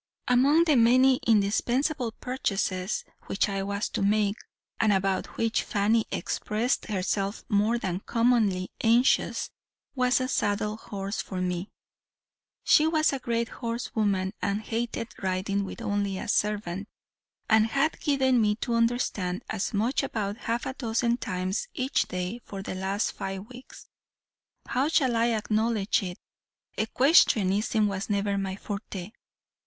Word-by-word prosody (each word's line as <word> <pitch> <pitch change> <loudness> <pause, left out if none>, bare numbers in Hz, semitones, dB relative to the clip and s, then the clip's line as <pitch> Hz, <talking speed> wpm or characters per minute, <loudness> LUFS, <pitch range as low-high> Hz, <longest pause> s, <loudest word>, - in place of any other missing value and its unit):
"Among 275 +6 +5
the 315 -4 +3
many 255 +3 +5
indispensable 235 +5 +1
purchases 200 -7 -2 0.2
which 200 - +1
I 195 -1 -2
was 200 +2 -2
to - - -3
make, 205 0 +2 0.4
and 220 - +3
about 195 -1 0
which 230 0 +1
Fanny 215 +2 +1
expressed 225 +5 -1
herself 200 0 -2
more 210 +3 +2
than 185 -5 -2
commonly 220 -5 +1
anxious, 235 +3 +3 0.4
was 250 -1 +2
a 255 - -1
saddle 210 -2 0
horse 200 -2 -4
for 185 - -6
me. 180 +1 -2 0.9
She 310 - +5
was 315 -2 +2
a 275 - -2
great 235 -1 -1
horse 235 +1 -5
woman, 195 -3 0
and 200 +2 -1
hated 230 +1 -3
riding 190 +1 -1
with - - -8
only 200 -1 -1
a 235 - -5
servant; 205 -2 -1 0.6
and 220 -1 +4
had 275 +6 0
given 265 -4 +2
me 210 -1 +2
to 235 +2 -3
understand 230 -6 0
as 220 -3 -2
much 230 +6 +1
about 205 -2 -3
half 235 0 -3
a - - -3
dozen 235 -1 0
times 185 -2 -2
each 255 +2 0
day 185 +6 -4
for 195 -1 -7
the - - -5
last 190 +3 -1
five 195 0 -5
weeks. 255 +1 -13 0.8
How 265 +3 0
shall 270 -6 +2
I 230 +1 +3
acknowledge 220 -2 +1
it 180 -2 -5 0.6
equestrianism 220 - +3
was 200 +1 -4
never 200 0 0
my 190 -1 -3
forte. 200 -2 -6
215 Hz, 140 wpm, -27 LUFS, 195-240 Hz, 0.9 s, Among